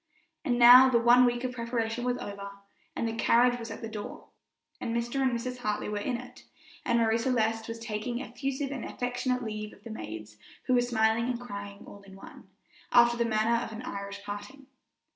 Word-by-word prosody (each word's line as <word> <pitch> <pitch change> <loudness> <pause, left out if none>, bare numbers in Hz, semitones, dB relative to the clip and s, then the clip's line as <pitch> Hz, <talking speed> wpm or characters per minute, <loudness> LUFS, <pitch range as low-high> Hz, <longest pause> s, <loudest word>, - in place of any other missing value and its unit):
And 245 -2 0
now 250 +2 +9
the 245 - +4
one 240 +2 +6
week 240 0 0
of 255 - -1
preparation 235 -1 -2
was 250 0 0
over, 200 0 -7 0.5
and 230 - -1
the 225 - -3
carriage 245 +2 +3
was 230 - -7
at - - -8
the - - -3
door, 215 -2 -8 0.5
and 230 - -3
Mr. 240 +3 -2
and 260 -1 +2
Mrs. 250 +1 -3
Harris 210 -3 -2
were 210 - -2
in 235 +4 -2
it, 250 +1 -12 0.4
and 235 -1 +1
Marie 225 0 +2
Celeste 225 -2 0
was 230 0 -5
taking 230 +1 -4
effusive 270 +3 -4
and 265 -4 -5
affectionate 250 0 -2
leave 215 -1 -5
of 200 - -19
the 230 - -8
maids, 110 - -8 0.3
who 255 - +1
were 245 - +5
smiling 225 -1 +1
and 245 -1 -2
crying 200 -4 -8
all 200 - -12
in 195 -1 -14
one, 195 - -13 0.4
after 240 -1 +6
the 235 0 0
manner 225 +2 +2
of - - -7
an 225 +2 -7
Irish 200 -3 -6
parting. 205 +7 -8
235 Hz, 200 wpm, -29 LUFS, 215-245 Hz, 0.5 s, now